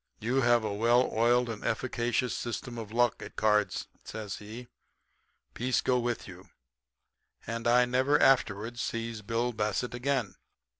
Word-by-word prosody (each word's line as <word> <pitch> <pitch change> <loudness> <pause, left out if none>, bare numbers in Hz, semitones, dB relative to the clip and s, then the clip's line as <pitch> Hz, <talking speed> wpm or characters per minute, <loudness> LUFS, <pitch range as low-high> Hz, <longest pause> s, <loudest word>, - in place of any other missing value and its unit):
You 125 +5 +1
have 120 -2 +4
a 105 -2 -2
well 120 +4 +3
oiled 120 +2 +3
and 115 -2 -6
efficacious 120 +1 -1
system 120 0 -5
of 110 -2 -7
luck 120 +1 +1
at - - -9
cards,' 105 -3 +1 0.2
says 105 -3 -6
he. 110 +4 -9 0.9
'Peace 125 +1 0
go 125 -1 +2
with 120 -1 -2
you.' 95 0 -12 1.0
And 115 +1 -3
I 125 +1 +5
never 130 +4 +2
afterward 120 -3 +2
sees 115 -1 -3
Bill 115 +3 -1
Bassett 110 +3 -1
again." 125 -5 -1
120 Hz, 145 wpm, -29 LUFS, 110-125 Hz, 1.0 s, I